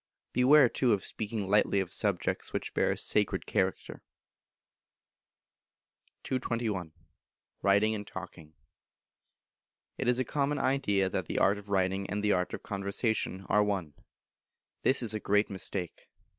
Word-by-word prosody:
Beware, 135 +2 +6
too, 120 0 +1
of 100 - -1
speaking 105 -2 -3
lightly 100 0 +3
of 95 -3 -3
subjects - - -1
which - - -3
bear - - +2
a - - 0
sacred - - 0
character. - - -2 2.2
221. 115 -9 -2 0.7
Writing 100 +2 +3
and 105 -1 -5
Talking. 85 -5 -9 1.4
It 130 - -1
is 125 0 +3
a 130 - +1
Common 145 +3 0
Idea 105 -10 +1
that - - -3
the - - -3
art 100 +1 +3
of 100 0 -14
writing 95 0 0
and 105 +2 -2
the 105 - +3
art 90 -1 +1
of - - -11
conversation 100 -1 -2
are 105 +1 +4
one; 95 -7 -2 0.9
this 130 -1 +3
is 110 - 0
a 110 - -2
great 105 +1 +1
mistake. 95 -2 -5
105 Hz, 140 wpm, -30 LUFS, 95-115 Hz, 2.2 s, Beware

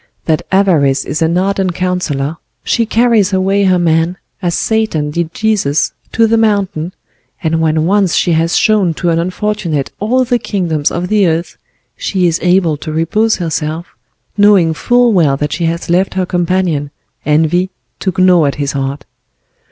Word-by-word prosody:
That 160 -2 +1
Avarice 155 -9 +2
is 150 +3 -3
an 165 +2 +1
ardent 190 -1 0
counselor; 165 -5 -2 0.3
she 230 -1 0
carries 225 -4 +2
away 195 +1 +1
her 185 -1 +3
man, 165 +1 +1 0.2
as 175 -3 -1
Satan 215 -10 -1
did 170 +1 -2
Jesus, 205 -10 0 0.2
to 225 - +3
the 225 +1 +2
mountain, 195 -6 0 0.5
and 165 0 0
when 160 0 +1
once 195 -1 +2
she 175 - +1
has 165 +2 +1
shown 205 -7 +2
to 175 +1 -1
an 165 - +1
unfortunate 180 -4 -2
all 255 +5 +1
the 245 -1 0
kingdoms 165 -10 -1
of 175 +1 -3
the 205 -1 +2
earth, 165 0 -2 0.4
she 185 -2 -1
is 165 -1 +1
able 175 -4 +2
to 155 +2 -6
repose 210 +8 +1
herself, 160 -1 -4 0.4
knowing 200 -6 +4
full 245 +7 +2
well 155 -7 +2
that 150 +1 -2
she 170 - -2
has 165 +1 -2
left 180 +3 +1
her 185 -1 0
companion, 175 -5 -1 0.3
Envy, 160 +5 +1 0.3
to 190 - -1
gnaw 180 -4 +4
at 140 - -2
his 140 -2 -2
heart. 135 -1 -4
175 Hz, 165 wpm, -14 LUFS, 160-195 Hz, 0.5 s, knowing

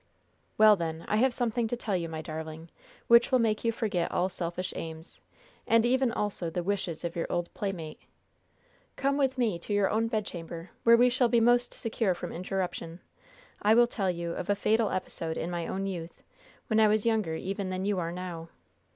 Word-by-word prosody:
"Well, 215 -1 +8
then, 165 -2 -4
I 210 - +1
have 260 +4 +4
something 240 -1 0
to 245 - -3
tell 210 -4 -2
you, 170 -2 -2
my 160 -1 -5
darling, 160 0 -7 0.3
which 235 +2 +6
will 260 - +5
make 220 -3 +1
you 230 - +2
forget 210 -7 -1
all 185 - +1
selfish 180 +1 -4
aims, 160 0 -8 0.5
and 230 0 +4
even 260 0 +2
also 205 -6 -2
the 175 +2 -3
wishes 185 -4 -2
of 170 -1 -3
your 170 - -2
old 175 0 -2
playmate. 175 -6 -5 0.9
Come 275 0 +1
with 270 -2 +1
me 220 -8 +1
to 190 - -8
your 205 -1 +2
own 225 +1 +1
bedchamber, 175 -6 -5
where 235 0 +8
we 245 +1 +5
shall 250 -1 +2
be 235 - +4
most 240 +1 +4
secure 220 -4 0
from - - -6
interruption. 180 -2 -4 0.6
I 215 +2 +5
will 240 +1 +7
tell 200 -5 -2
you 170 -1 -3
of 175 +3 -5
a 205 - +3
fatal 220 +1 +2
episode 165 -3 -3
in 170 - -3
my 170 -1 -3
own 195 +1 -3
youth, 175 -4 -6 0.4
when 220 -1 +2
I 220 - +6
was 215 +1 +2
younger 215 -8 +1
even 195 +3 -3
than 185 +1 -3
you 200 -2 0
are 170 -1 -2
now. 175 -2 -6
195 Hz, 200 wpm, -29 LUFS, 170-230 Hz, 0.9 s, Well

